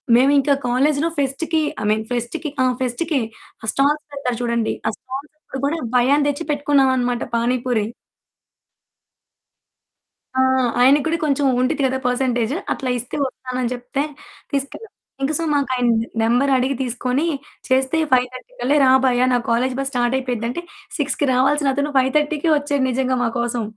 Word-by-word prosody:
మేమింకా 275 +3 +4
కాలేజీలో 285 +6 +2
ఫెస్ట్‌కి 315 +4 0 0.2
I - - -3
mean 215 +1 +1
ఫెస్ట్‌కి 240 +6 -3
ఆహ్, 255 -1 +2
ఫెస్ట్‌కే 265 +4 0 0.4
ఆ - - -5
స్టాల్స్ 295 +2 +2
పెడతారు 265 -4 -3
చూడండి. 235 -2 0
ఆ - - +3
స్టాల్స్‌ 265 +3 -8
అప్పుడు 270 - -8
గూడా 320 +4 -1 0.2
భయ్యాని 275 +4 +4
దెచ్చి 290 +3 -3
పెట్టుకున్నాం 285 -2 +3
అనమాట 245 -1 0
పానిపూరి. 240 -1 0 2.5
ఆ! - - +6 0.4
ఆయన 265 +3 +7
గూడా 325 +1 +1
కొంచెం 285 -1 +1
ఉండిద్ది 275 +3 +1
గదా! 260 0 -1
పర్సెంటేజు 245 0 0 0.2
అట్లా 260 - -4
ఇస్తే 245 +1 -6
వస్తానని 255 -1 -4
జెప్తే 250 +3 -3 0.5
తీసుకెళ్ళాం. 280 +10 -4 0.3
ఇంక 275 - +1
సో, - - -1
మాకాయన 260 -4 +1 0.3
నెంబరడిగి 260 +3 +2
తీసుకొని 250 +4 -1 0.4
చేస్తే 265 +4 +2
5:30 255 - 0
కల్లా 280 +4 +2
రా 260 - +5
భయ్యా 250 -1 +3
నా - - +4
కాలేజీ 250 +2 +1
బసు 275 0 -2
స్టార్టయిపోయిద్ది 245 -1 0
అంటే 345 +8 -4 0.3
6కి 290 -1 0
రావాల్సినతను 285 +2 +2
5:30కే 295 +4 +1
ఒచ్చాడు 285 -1 -1
నిజంగా 255 0 0
మా - - +2
కోసం. 235 -1 -1
260 Hz, 140 wpm, -20 LUFS, 245-285 Hz, 2.5 s, ఆయన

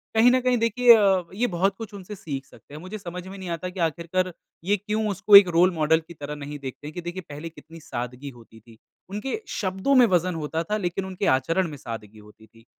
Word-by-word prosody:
कहीं 230 +2 +6
न 255 - +4
कहीं 250 0 +2
देखिए 235 +1 +6
अ, 195 -4 +3
ये 235 +5 0
बहुत 190 +3 +1
कुछ 220 -2 -8
उनसे 200 +1 -8
सीख 140 -7 -6
सकते 140 - -18
हैं। 150 - -8
मुझे 185 +4 -7
समझ 180 -2 -7
में 195 +1 -9
नहीं 190 -2 -7
आता 170 +2 -3
कि 180 +1 -9
आख़िरकार, 170 +3 -1 0.3
ये 205 +4 +2
क्यों 215 +2 -2
उसको 205 +1 +4
एक 200 -1 +11
रोल 180 +2 +5
मॉडल 160 0 +3
की - - -10
तरह 150 -2 -7
नहीं 145 0 -7
देखते 140 +2 -7
कि 175 - -6
देखिए 175 +2 -5
पहले 150 +3 -7
कितनी 165 0 -14
सादगी 125 0 -6
होती 110 -1 -17
थी। 115 0 -18 0.3
उनके 210 - -3 0.2
शब्दों 190 +7 0
में - - +7
वज़न 180 0 0
होता 160 +2 -2
था 215 - +2
लेकिन 190 -1 -2
उनके 190 +1 -4
आचरण 165 +8 0
में 150 - -8
सादगी 110 -4 -8
होती 105 +1 -17
थी। 115 0 -22
180 Hz, 230 wpm, -25 LUFS, 150-200 Hz, 0.3 s, एक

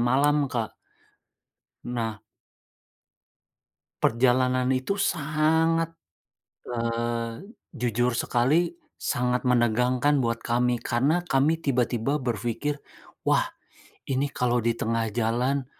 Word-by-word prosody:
malam, 140 +4 +3
Kak. 115 -4 -2 1.1
Nah 115 -3 -3 1.8
Perjalanan 125 +1 +3
itu 130 +11 -1
sangat 160 -1 +1 0.8
eee, 115 0 -2 0.4
jujur 120 +1 +1
sekali 130 +8 +2 0.3
sangat 125 0 0
menegangkan 125 +3 +2
buat 115 -1 0
kami 120 +1 +2
karena 145 +11 0
kami 150 +1 +2
tiba-tiba 130 +1 +1
berpikir, 120 +5 -2 0.5
"Wah, - - +2 0.6
ini 135 +1 0
kalau 125 -2 +2
di - - +4
tengah 115 0 0
jalan, 125 +4 0
125 Hz, 85 wpm, -26 LUFS, 120-145 Hz, 1.8 s, di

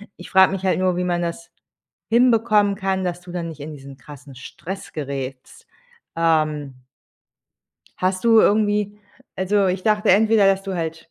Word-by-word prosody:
Ich - - -12
frage 190 0 +5
mich 190 -1 -5
halt 190 -1 +1
nur, 185 -1 +1
wie 180 - -1
man 175 -1 -1
das 175 +7 -5 0.6
hinbekommen 225 -4 +3
kann, 190 -1 -2
dass 180 -1 -3
du 175 -1 -12
dann 170 -2 -4
nicht 155 -2 -11
in 150 +2 -7
diesen 135 -1 -12
krassen 140 -1 -13
Stress 185 +8 -9
gerätst. 135 -3 -7 0.5
Ähm 155 -5 -1 1.1
hast 185 +2 -1
du 225 -1 +6
irgendwie 210 -1 +1 0.4
also, 195 +1 +1
ich 185 0 -1
dachte 210 -1 +2
entweder, 215 +1 +4
dass 195 0 +2
du 195 -1 -5
halt 165 -1 -5
185 Hz, 160 wpm, -21 LUFS, 155-205 Hz, 1.1 s, du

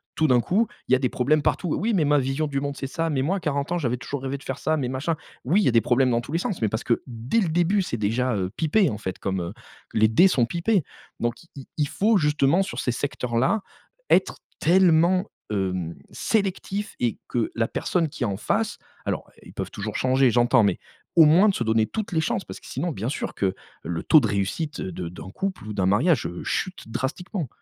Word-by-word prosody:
tout 160 - +2
d'un 125 -3 +4
coup 200 - +1 0.2
il - - -5
y - - +9
a 130 - +1
des 130 -3 +1
problèmes 150 +5 +2
partout. 165 +2 0
«Oui 225 +3 0
mais 170 -7 +3
ma 145 0 +4
vision 135 +4 -1
du 140 -1 -1
monde 140 0 -3
c'est 135 - -4
ça. 165 +3 -2
Mais 135 -3 0
moi 190 +7 +1
à - - -3
40 140 -1 -2
ans 175 - +1
j'avais 125 -7 -1
toujours 135 +2 -5
rêvé 135 +1 -2
de 140 - -15
faire 135 - -4
ça. 155 0 +1
Mais 130 -4 -2
machin». 135 +6 -1 0.3
Oui 180 +11 +3
il - - +1
y - - +4
a - - +2
des 115 - +4
problèmes 125 +2 +2
dans 120 0 +2
tous 120 - -10
les 165 - +1
sens 180 - -3
mais 110 - +2
parce 110 +2 -3
que 120 - 0
dès 120 - -1
le 185 -7 +1
début 175 +5 +2
c'est 120 -10 -3
déjà, 115 +4 0
heu, 95 -1 -2
pipé 170 +3 +3
en 105 - -4
fait 95 -3 -4
comme, 95 -1 -2
heu 85 +2 -5 0.4
les 110 0 +4
dés 115 - +5
sont 130 -10 +2
pipés, 175 - +1 0.4
donc 120 +4 -2
il 170 - -22
il 135 -2 -9
il 150 -2 +1
faut 210 +8 +2
justement 150 +2 +3
sur 195 - -5
ces 125 - 0
secteurs-là, 130 - 0 0.5
être - - +3 0.2
tellement, 180 +1 +4 0.3
hem, 95 -4 -2 0.2
sélectif 200 0 -1
et 120 -2 0
que 120 -2 -1
la 115 -1 +1
personne 165 +4 -1
qui 135 - -5
est - - +2
en 100 -1 -2
face - - -1 0.3
alors - - -3
ils - - -13
peuvent - - -5
toujours 105 +1 -5
changer 130 0 +3
j'entends 120 +1 +4
mais 100 -3 +1 0.4
au 165 - +8
moins 175 +8 +6
de - - +2
se 120 - -1
donner 110 -1 +2
toutes 210 - -4
les 160 -2 +1
chances 190 +4 -1
parce - - -9
que - - -18
sinon 155 +7 -2
bien 115 -3 -3
sûr 145 - -4
que 95 -2 0 0.3
le 80 0 -3
taux 155 - +7
de 130 - -1
réussite 105 - -2
de 90 -2 -5
d'un 90 +1 -9
couple 190 - -4
ou 105 - -4
d'un 95 -2 0
mariage, 120 - +3
heu, 85 +1 -5
chute 185 -11 -3
drastiquement. 155 - -3
135 Hz, 245 wpm, -24 LUFS, 115-170 Hz, 0.5 s, y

